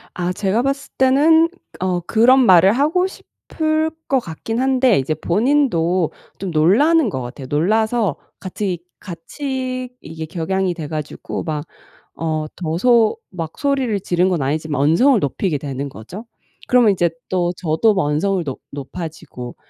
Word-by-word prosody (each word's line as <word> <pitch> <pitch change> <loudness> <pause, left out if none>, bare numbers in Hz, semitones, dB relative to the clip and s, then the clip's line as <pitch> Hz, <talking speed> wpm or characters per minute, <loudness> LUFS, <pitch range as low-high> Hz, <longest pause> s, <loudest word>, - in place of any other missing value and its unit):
아 180 0 -1
제가 200 +4 0
봤을 275 +1 -2
때는 300 +5 +5 0.3
어 180 -1 0
그런 240 +8 +4
말을 185 0 +6
하고 310 +9 +2
싶을 315 -4 -3 0.2
것 270 - +3
같긴 225 +5 -5
한데 260 -3 +3
이제 140 +4 -1
본인도 185 - +1 0.3
좀 190 -1 -4
놀라는 235 - +4
거 130 - -4
같아요. 130 +2 -7
놀라서 215 - +1 0.2
같이 185 -1 -3 0.2
같이 255 - -5
이게 160 0 -7
격양이 180 +3 -1
돼가지고 155 -2 -5
막 150 -2 -3 0.6
어 155 -1 -1
더 170 -3 -3
소 235 +1 +4
막 165 -4 -6
소리를 270 -7 0
지른 180 0 +1
건 180 -5 0
아니지만 150 +1 -1
언성을 230 - +4
높이게 150 +4 -1
되는 140 -1 -5
거죠. 140 - -10 0.4
그러면 245 -4 +5
이제 175 -3 +1 0.2
또 175 -1 0
저도 170 +6 +2
뭐 190 - +1
언성을 175 +5 0
높 135 -4 -5
높아지고. 145 -3 -7
185 Hz, 280 characters per minute, -19 LUFS, 160-250 Hz, 0.6 s, 말을